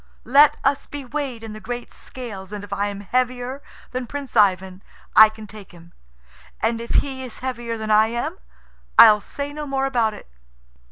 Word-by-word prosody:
"Let 285 +3 +6
us 275 +1 0
be 285 -2 -7
weighed 260 -4 -4
in 220 -1 -7
the 215 - -8
great 245 +2 -6
scales, 205 -7 -9
and 205 -1 -6
if 205 - -7
I 205 - -1
am 200 0 -6
heavier 250 +4 -2 0.3
than 255 -1 -4
Prince 280 0 -7
Ivan, 190 -3 +2 0.3
I 220 0 +9
can 220 0 -11
take 205 -2 -13
him; 170 0 -16 0.7
and 230 +1 0
if 235 - -8 0.2
he 265 -2 -5
is 250 -3 -9
heavier 240 -2 -3
than 220 -1 -3
I 215 +1 +5
am, 235 +1 -4 0.6
I'll 210 -1 +9
say 285 +6 -6
no 300 0 -6
more 270 -1 -1
about 235 -5 0
it." - - -13
235 Hz, 185 wpm, -22 LUFS, 210-260 Hz, 0.7 s, I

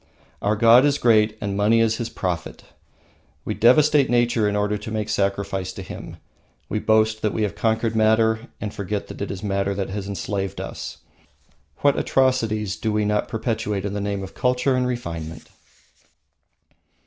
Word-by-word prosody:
Our 105 +1 +1
god 115 +3 +6
is 145 -1 +3
great, 110 -3 +3
and 100 -1 -3
money 105 +3 +3
is 115 0 +2
his 115 - -3
Prophet! 90 -3 -4 0.8
We - - -2
devastate 145 +3 +4
nature 120 -3 +2
in 105 - -2
order 105 0 0
to 105 +2 -6
make 110 -1 -3
sacrifice 100 -2 -1
to - - -7
him. - - -9 0.5
We 110 - -1
boast 110 0 +2
that 105 - 0
we 110 - 0
have 105 - -1
conquered 115 0 0
Matter 110 +1 +2
and 105 -1 -5
forget 100 +1 -4
that - - -9
it 100 - -3
is 95 +1 -6
Matter 100 -1 -1
that 100 -1 -3
has 100 0 -5
enslaved 100 -1 -3
us. - - -6 0.8
What 145 -1 +3
atrocities 110 -6 +1
do 110 - -1
we 105 0 +1
not 105 0 0
perpetrate 105 -3 -2
in 100 - -3
the 100 - -3
name 100 -1 -2
of 95 - -9
culture 125 +1 +1
and 125 0 +1
refinement! 85 -10 -5
105 Hz, 170 wpm, -23 LUFS, 100-115 Hz, 0.8 s, god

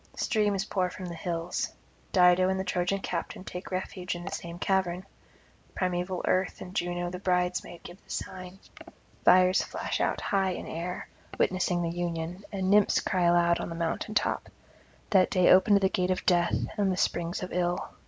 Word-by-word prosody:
Streams 205 -3 +1
pour 185 -3 0
from 185 +1 -8
the 175 - -5
hills. 170 0 -3 0.4
Dido 180 0 +5
and 190 0 0
the - - -1
Trojan 180 +2 -1
captain 175 +1 -4
take 180 -1 -7
refuge 185 -1 -3
in 175 0 -7
the 195 - -5
same 170 0 -6
cavern. 185 -1 0 0.7
Primeval 180 0 -1
Earth 185 0 +1
and 180 +1 -9
Juno 175 0 -1
the 180 - -6
bridesmaid 180 -2 -1
give 175 +3 -12
the - - -29
sign; 185 0 -6 0.7
fires 185 +1 +6
flash - - -3
out - - 0
high 190 -2 0
in - - -6
air, 175 +2 -5 0.3
witnessing 180 -1 +1
the 165 - -1
union, 175 +1 -4
and 190 -2 -2
Nymphs 205 0 +5
cry 180 -2 0
aloud 170 0 +4
on - - -4
the 165 - -5
mountain 170 +5 -2
top. - - 0 0.6
That 190 -2 +5
day 185 -1 +4
opened 200 +2 +6
the 190 - +4
gate 185 -1 0
of 185 - -1
death 175 -1 +3 0.2
and 200 -2 +2
the 185 - -2
springs 175 +1 -1
of 185 - -6
ill. 175 0 -1
180 Hz, 180 wpm, -28 LUFS, 175-190 Hz, 0.7 s, fires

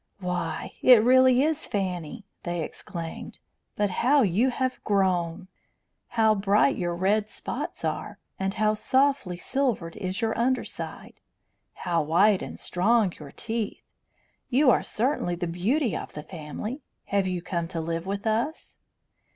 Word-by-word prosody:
"Why, 180 -3 -3
it 245 -4 +8
really 260 +1 +6
is 315 0 0
Fanny!" 185 -2 -3 0.2
they 175 -2 -2
exclaimed. 170 -1 -7 0.4
"But 205 -2 +1
how 275 +3 +5
you 210 +6 +2
have 255 0 -2
grown! 185 -3 +1 0.7
How 220 -1 +5
bright 205 +6 +3
your 175 -1 -2
red 205 +4 +1
spots - - -5
are! - - -3 0.2
And 195 0 -1
how 215 0 +2
softly 260 -5 +1
silvered 240 -8 -1
is 190 -2 -3
your 225 -2 0
under 255 +3 +1
side! - - -8 0.7
How 170 -2 +2
white 185 +6 +4
and - - -7
strong 205 +1 +2
your 150 -2 -9
teeth! 225 -2 -3 0.7
You 260 +1 +5
are - - +3
certainly 225 -7 -1
the 175 +1 -3
beauty 210 - 0
of - - -6
the 150 - -7
family. 180 - -6 0.3
Have 200 -2 +3
you 180 -2 -2
come 170 -3 -2
to 170 -1 -4
live 165 +2 -3
with 200 +2 -3
us?" 230 +8 -2
200 Hz, 145 wpm, -26 LUFS, 175-240 Hz, 0.7 s, it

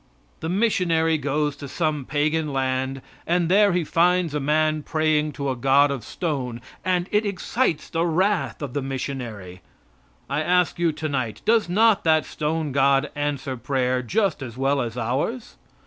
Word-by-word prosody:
The 160 - -4
missionary 170 -6 +2
goes 145 +1 -1
to 140 - -7
some 150 -2 -1
pagan 150 +1 0
land, 130 0 -1 0.2
and 175 -1 +1
there 200 +2 +5
he 175 -1 +1
finds 175 0 +2
a 150 - 0
man 155 +2 +1
praying 155 -1 0
to 140 0 -2
a - - -2
god 135 +3 +4
of 135 -4 -4
stone, 130 -8 -3 0.2
and 180 0 0
it 210 +1 +2
excites 200 - -1
the 165 0 -1
wrath 180 0 0
of 135 -4 -5
the 145 - -1
missionary. 120 -9 -5 0.7
I 140 +2 -1
ask 180 +1 +1
you 170 -1 +2
tonight, 130 -9 -3
does 220 -4 +3
not 215 +3 +4
that 155 -1 +3
stone 155 -1 -2
god 140 +1 +2
answer 145 -3 -2
prayer 125 0 0
just 190 - 0
as 120 -2 -7
well 135 +1 +1
as 120 -1 -4
ours? 135 - -2
150 Hz, 165 wpm, -23 LUFS, 135-170 Hz, 0.7 s, there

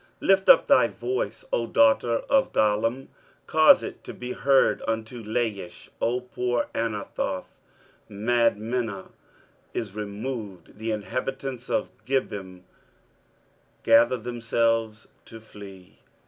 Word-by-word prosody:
23:010:030 - - -32 0.2
Lift 195 0 +4
up 270 - +7
thy - - +5
voice, 390 +5 -4
O - - 0
daughter 275 - +3
of 275 -1 +2
Gallim: 115 +5 +1 0.4
cause - - +6
it - - -8
to - - -9
be 125 0 -6
heard 135 +1 +3
unto 115 +1 -3
Laish, 105 -5 -3
O 125 +2 0
poor 125 -1 -2
Anathoth. 105 -4 -4 0.5
23:010:031 100 -1 -10
Madmenah 115 -3 0 0.6
is 105 -4 -3
removed; 105 -1 -6
the 110 +1 -3
inhabitants 125 +4 -4
of - - 0 0.2
Gebim 100 -9 -3 1.2
gather 115 +2 +5
themselves 115 -2 -1 0.2
to 115 - -11
flee. 100 -4 -13
115 Hz, 115 wpm, -25 LUFS, 105-125 Hz, 1.2 s, up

